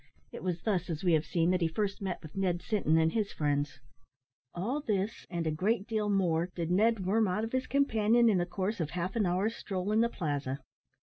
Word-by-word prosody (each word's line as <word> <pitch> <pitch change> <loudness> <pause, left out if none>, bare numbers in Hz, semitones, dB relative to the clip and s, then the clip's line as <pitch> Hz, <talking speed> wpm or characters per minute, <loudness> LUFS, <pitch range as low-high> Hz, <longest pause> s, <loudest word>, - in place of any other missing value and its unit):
It - - -8
was 175 -3 -3
thus, 185 -5 0
as 160 0 -3
we 175 -2 +3
have 155 0 +2
seen, 170 0 +2
that 185 -1 +1
he 165 - +3
first 200 +5 -2
met 185 -3 -3
with 155 - -11
Ned 180 -3 0
Sinton 175 -7 +2
and 160 0 +3
his 210 0 -1
friends. 145 -1 -1 0.8
All 235 +12 -1
this, 210 -4 -2
and 170 -2 -2
a 160 - +1
great 200 +6 0
deal 215 -2 -1
more, 175 -4 +1
did 170 -1 -2
Ned 210 +1 +3
worm 215 +3 +3
out 190 +4 -1
of 225 - -3
his 260 0 -1
companion 235 -4 +3
in 205 -5 +4
the 175 - 0
course 190 +4 -2
of 160 -3 -1
half 180 +3 -3
an 215 -5 +2
hour's 195 +6 0
stroll 190 +1 -3
in 220 +1 +4
the 235 - +3
Plaza. 145 - -3
185 Hz, 230 wpm, -31 LUFS, 170-215 Hz, 0.8 s, in